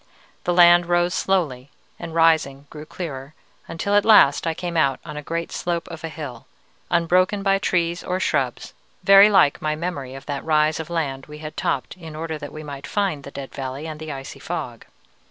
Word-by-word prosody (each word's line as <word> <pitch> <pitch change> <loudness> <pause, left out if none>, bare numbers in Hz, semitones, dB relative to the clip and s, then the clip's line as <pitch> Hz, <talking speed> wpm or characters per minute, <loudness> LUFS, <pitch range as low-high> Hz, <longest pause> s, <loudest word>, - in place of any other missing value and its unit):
The 175 - +1
land 175 0 +7
rose 175 0 +2
slowly, 145 -11 -1 0.3
and 165 -1 -7
rising 160 -4 +2
grew 155 0 -9
clearer, 145 -5 -7 0.3
until 175 +5 -3
at 205 0 +5
last 170 -9 +5
I 165 - -1
came 175 0 -5
out 140 -5 +2
on 150 -2 -7
a 150 - -5
great 165 +3 -4
slope 170 -1 -3
of 165 -2 -8
hill, 150 -7 -7 0.4
unbroken 180 +4 +2
by 195 -1 +3
trees 175 -3 0
or 185 0 -2
shrubs, - - -1 0.3
very 195 +1 +8
like 190 -8 +4
my 155 0 -1
memory 150 -6 -5
of 135 - -10
that 145 -2 -4
rise 155 0 +2
of 160 0 -6
land 140 -6 -3
we 150 0 -10
had 155 0 -8
topped 130 - -2
in 160 -3 -10
order 160 0 -4
that 145 -1 -8
we 155 - -8
might 140 -1 -8
find 195 -9 -1
the - - -8
dead 140 -1 -8
valley 135 +2 -5
and 155 -1 -6
the 155 -1 -6
icy 135 -1 -8
fog. - - -5
160 Hz, 195 wpm, -22 LUFS, 145-175 Hz, 0.4 s, very